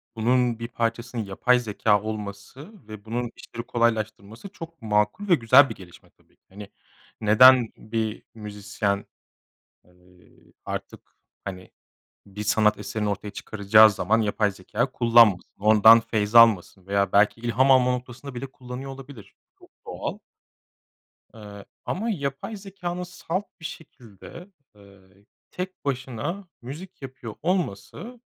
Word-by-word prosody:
bunun 120 +1 +1
bir 115 - -5
parçasının 115 0 -3
yapay 125 +6 +2
zekâ 105 -2 +1
olması 110 - -7 0.2
ve 110 -1 -11
bunun 120 +1 -3
işleri 115 - -9
kolaylaştırması 110 - -2
çok 165 -5 -11
makul 105 - 0
ve 175 - +7
güzel 135 +2 +6
bir - - -6
gelişme 90 -2 -16
tabii - - -33
ki. - - -66
Hani 100 +1 -11 0.5
neden 120 +3 +6
bir 110 0 -4
müzisyen, 105 -1 -3 0.8
ııı, 90 0 -25
artık - - -6 0.5
hani 95 -1 -8 0.5
bir 100 +1 -8
sanat 105 0 +2
eserini 105 -1 -3
ortaya 105 +1 -4
çıkaracağı 110 +1 +4
zaman 110 +2 0
yapay 105 -1 0
zekâ 105 +7 -3
kullanmasın. 115 -7 +4
Ondan 110 +2 +7
feyzalmasın 110 -4 +3
veya 100 -1 0
belki 105 +3 +3
ilham 125 +3 +2
alma 125 -1 +5
noktasında 125 +2 -6
bile 120 - -5
kullanıyor 130 +1 -9
olabilir. 135 -5 -12 0.3
Çok - - -19 0.2
doğal. - - -5 1.2
Eee, 105 -2 -11 0.2
ama 220 +6 -2
yapay 140 +3 -4
zekânın 185 -3 -6
salt 180 +1 -4 0.2
bir - - -13
şekilde, 135 - -11 0.3
eee, 100 -1 -19 0.5
tek 185 +1 -7
başına 140 - -4
müzik 150 +8 -10
yapıyor 130 -4 -8
olması, 180 - -3
115 Hz, 125 wpm, -24 LUFS, 105-135 Hz, 1.2 s, ve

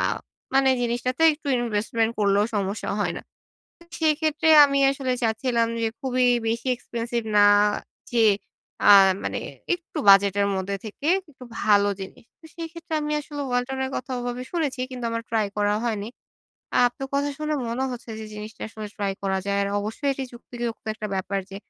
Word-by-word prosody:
আ - - +1 0.5
মানে 270 0 +5
জিনিসটাতে 245 +5 -1
একটু 295 0 -11
ইনভেস্টমেন্ট 225 0 0
করলেও 200 0 +3
সমস্যা 200 +1 -2
হয় - - 0
না। - - -7 0.8
সেক্ষেত্রে 310 0 +1 0.2
আমি 275 -1 +1
আসলে 270 -2 -2
চাচ্ছিলাম 230 +1 +1
যে 225 - +2
খুবই 255 -2 +1 0.2
বেশি 230 +3 -2
expensive 235 -1 -4
না 205 - +7 0.7
যেয়ে 225 -3 +5 0.6
আ - - +10 0.3
মানে - - -2 0.4
একটু 340 -2 -8
বাজেটের 200 0 +6
মধ্যে 190 +1 -2
থেকে 220 +7 -7 0.2
ইকটু 260 -2 -13 0.2
ভালো 205 -1 +4
জিনিস। 195 +5 -9 0.2
তো - - -25
সেইক্ষেত্রে 335 0 -6
আমি 300 0 -2
আসলে 290 0 -7
"ওয়ালটন" 245 +2 -1
এর 265 - -4
কথা 255 +1 -6
ওভাবে 245 +1 -4
শুনেছি 295 -7 -1
কিন্তু 250 -2 -6
আমার 230 0 -2
ট্রাই 220 -2 +1
করা 205 0 +2
হয়নি। 215 -3 -2 0.8
আপনার 245 +2 -5
কথা 285 +1 +1
শুনে 305 0 -1
মনে 250 +3 -1
হচ্ছে 245 -1 -8
যে 220 - -6
জিনিসটা 215 +1 -8
আসলে 215 -1 -7
ট্রাই 200 -2 -1
করা 190 -1 0
যায়। 200 0 0
আর 200 - -1
অবশ্যই 220 +7 -3
এটি 270 0 -4
যুক্তিযুক্ত 240 -1 -6
একটা 215 -1 -5
ব্যাপার 195 +1 -2
যে 195 - -7
235 Hz, 165 wpm, -24 LUFS, 210-270 Hz, 0.8 s, আ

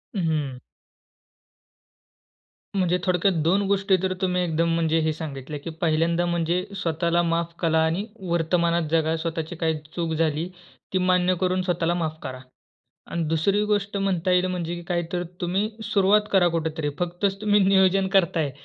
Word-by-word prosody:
हं, 190 - 0
हं. 145 -5 -2 2.2
म्हणजे 180 -2 +2
थोडक्यात 185 +1 +2
2 190 +5 +3
गोष्टी 195 -1 +2
तर 185 0 +1
तुम्ही 180 -1 +1
एकदम 165 0 0
म्हणजे 165 -1 +2
हे 160 0 +1
सांगितले, 150 -2 -6
की 155 +4 -7
पहिल्यांदा 170 +1 +2
म्हणजे 175 +1 0
स्वतःला 170 0 0
माफ 170 0 -1
करा 160 -2 +2
आणि 175 +6 -1 0.2
वर्तमानात 170 0 +1
जगा. 160 0 +2
स्वतःची 165 0 -4
काही 160 -1 0 0.2
चूक 165 -2 -1
झाली 160 +1 0 0.5
ती - - +3
मान्य 185 0 +2
करून 185 0 +1
स्वतःला 175 -2 0
माफ 160 -2 -2
करा 130 -1 -6 0.7
आणि 170 -1 -1
दुसरी 195 +6 +1
गोष्ट 205 -1 0
म्हणता 185 -2 0
येईल 180 0 +3
म्हणजे 175 -1 -3
काय 175 -1 0
तर 175 0 0 0.2
तुम्ही 190 +5 0
सुरुवात 200 0 +3
करा 185 -3 +5
कुठेतरी. 160 -2 -1
फक्तच 180 +3 -1
तुम्ही 210 -1 +3
नियोजन 190 0 +4
करत 170 -3 +2
आहे 145 -4 0
175 Hz, 155 wpm, -24 LUFS, 160-185 Hz, 2.2 s, करा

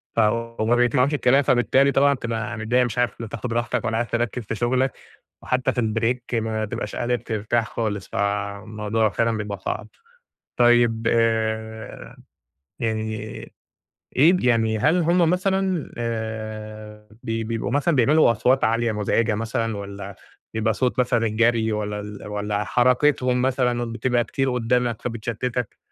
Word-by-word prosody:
ف - - +1
وما 115 +1 +1
بيسمعوش 125 +4 +2
الكلام. 135 0 +4
فبالتالي 130 +3 +3
طبعًا 140 +1 +4
بتبقى 115 -4 -4
متضايق، 120 +3 +2
مش 120 0 -5
عارف 120 -1 0
لا 115 - -5
تاخد 115 +2 -5
راحتك، 120 +1 -1
ولا 115 -1 0
عارف 120 0 -2
تركز 120 +1 -1
في 110 - -4
شغلك، 125 +3 +1 0.5
وحتى 130 +1 0
في 125 - 0
الbreak 115 +2 -1
ما 110 -1 -2
تبقاش - - -5
قادر 120 0 0
ترتاح 110 0 -1
خالص. 105 -4 -3
فالموضوع 105 +2 -1
فعلًا 115 +1 0
بيبقى 100 -2 -4
صعب. - - -4 0.7
طيب، 120 -2 +4
آآ 110 -1 -1 0.6
يعني 110 -1 -1 1.0
إيه 160 +8 +6
يعني 110 -2 +2
هل 160 +9 +3
هُم 170 0 +3
مثلًا 190 -2 0
آآ 110 -2 -5
ب - - -16 0.2
بيبقوا 115 -1 -2
مثلًا 145 +3 +2
بيعملوا 135 +1 +5
أصوات 125 +4 +2
عالية 115 +1 +2
مزعجة 105 +1 +1
مثلًا، 115 0 -2
والّا 100 -1 -7 0.4
بيبقى 110 0 +1
صوت 125 +3 -1
مثلًا 120 -2 +2
الجري، 115 +1 +2
والّا 105 -1 -2
ال 105 0 -8
والّا 105 0 -2
حركتهم 125 +3 +2
مثلًا 125 -2 0
بتبقى 120 0 +1
كتير 135 +2 -1
قدامك، 120 -1 0
فبتشَتّتك، 120 +1 -3
115 Hz, 140 wpm, -23 LUFS, 110-125 Hz, 1.0 s, إيه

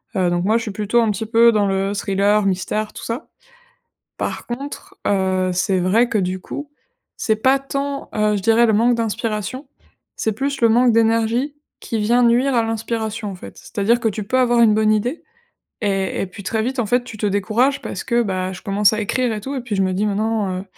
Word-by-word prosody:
Heu, 185 -2 +2
donc 175 +1 0
moi, 220 +2 +3
je - - -2
suis 220 - -4
plutôt 215 +4 +1
un 225 - +2
petit 210 +2 -2
peu 230 +1 +5
dans 210 -2 +2
le 195 +1 0
thriller, 200 +1 +1
mystère, 195 +3 -1
tout - - -9
ça. 235 +6 -5 0.9
Par - - -4
contre, 275 +4 -7
heu, 190 -2 +1
c'est 185 +1 +1
vrai 210 +7 +3
que 220 - 0
du 185 0 -2
coup, 285 +9 -7 0.5
c'est 220 - +1
pas 260 +5 +3
tant, 275 +1 -4
heu, 210 -1 +1
je - - -4
dirais, 230 +3 +4
le 220 - +3
manque 235 +3 +3
d'inspiration, 230 +3 -3 0.5
c'est 220 - -1
plus 275 +5 -3
le 230 - +5
manque 240 +1 +4
d'énergie 230 +5 +1 0.3
qui 225 - -3
vient 240 +4 +3
nuire 245 +3 +3
à 230 - +3
l'inspiration, 225 -1 -3
en 195 - -6
fait. 180 - -11
C'est-à-dire 230 +2 0
que 230 - 0
tu 215 -1 -2
peux 255 +6 -1
avoir 240 -2 +3
une 220 -2 +6
bonne 215 0 +3
idée 245 +9 -2 0.6
et 195 -2 -1
et - - -2
puis 195 +3 -11
très 220 +3 -1
vite, 260 +3 -3
en 230 - -1
fait, 245 +3 +1
tu 230 - -9
te 210 - -1
décourages 220 +7 +1
parce - - -5
que, 240 -1 +2
bah, 185 -3 -2
je 185 - -10
commence 205 0 +3
à 215 - -1
écrire 245 +3 0
et 215 - -4
tout, 270 +6 -5
et 265 - -2
puis 235 -5 -4
je 195 - +2
me 185 -1 0
dis: 200 +3 0
«Mais 205 - 0
non, 210 -4 -1
heu - - -13
220 Hz, 230 wpm, -20 LUFS, 200-240 Hz, 0.9 s, une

